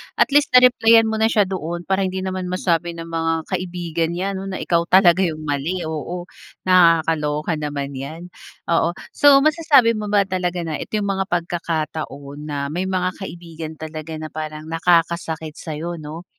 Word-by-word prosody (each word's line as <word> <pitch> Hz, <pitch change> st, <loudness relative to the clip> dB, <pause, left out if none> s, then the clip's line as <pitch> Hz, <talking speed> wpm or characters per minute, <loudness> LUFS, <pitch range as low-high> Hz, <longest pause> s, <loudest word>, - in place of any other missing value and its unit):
At -, -, +2 dB
least 290 Hz, 0 st, +4 dB
na-replyan 230 Hz, -3 st, +6 dB
mo 220 Hz, -, -2 dB
na 220 Hz, -, +4 dB
siya 215 Hz, -2 st, +3 dB
doon 175 Hz, -2 st, -4 dB
para 190 Hz, +1 st, 0 dB
hindi 185 Hz, 0 st, -4 dB
naman 185 Hz, -1 st, -3 dB
masabi 175 Hz, -2 st, -1 dB
ng 165 Hz, -, -6 dB
mga 165 Hz, 0 st, -1 dB, 0.2 s
kaibigan 175 Hz, -2 st, -2 dB
niya, 190 Hz, +3 st, -2 dB
'no, 195 Hz, 0 st, -5 dB
na 185 Hz, -, -4 dB
ikaw 170 Hz, 0 st, +1 dB
talaga 185 Hz, -2 st, +5 dB
yung 155 Hz, -1 st, -5 dB
mali, 155 Hz, +5 st, -2 dB
oo. 160 Hz, +3 st, -4 dB, 0.4 s
Nakakaloka 165 Hz, -3 st, +3 dB
naman 145 Hz, -2 st, -4 dB
'yan, 160 Hz, +6 st, -8 dB, 0.4 s
oo. 170 Hz, +1 st, +2 dB, 0.2 s
So, 280 Hz, -1 st, +6 dB
masasabi 310 Hz, -7 st, +4 dB
mo 215 Hz, -2 st, -4 dB
ba 205 Hz, -1 st, +3 dB
talaga 180 Hz, -2 st, -2 dB
na 160 Hz, -2 st, -4 dB
ito -, -, -5 dB
yung 200 Hz, -2 st, 0 dB
mga 195 Hz, 0 st, -2 dB
pagkakataon 155 Hz, -4 st, -4 dB
na 145 Hz, -, -4 dB
may 180 Hz, +4 st, -2 dB
mga 185 Hz, -1 st, 0 dB
kaibigan 165 Hz, -4 st, -7 dB
talaga 155 Hz, 0 st, -7 dB
na 155 Hz, 0 st, -7 dB
parang 155 Hz, 0 st, -6 dB
nakakasakit 165 Hz, -2 st, 0 dB
sa'yo, 165 Hz, +2 st, -5 dB
'no 155 Hz, +3 st, -8 dB
170 Hz, 170 wpm, -21 LUFS, 160-190 Hz, 0.4 s, na-replyan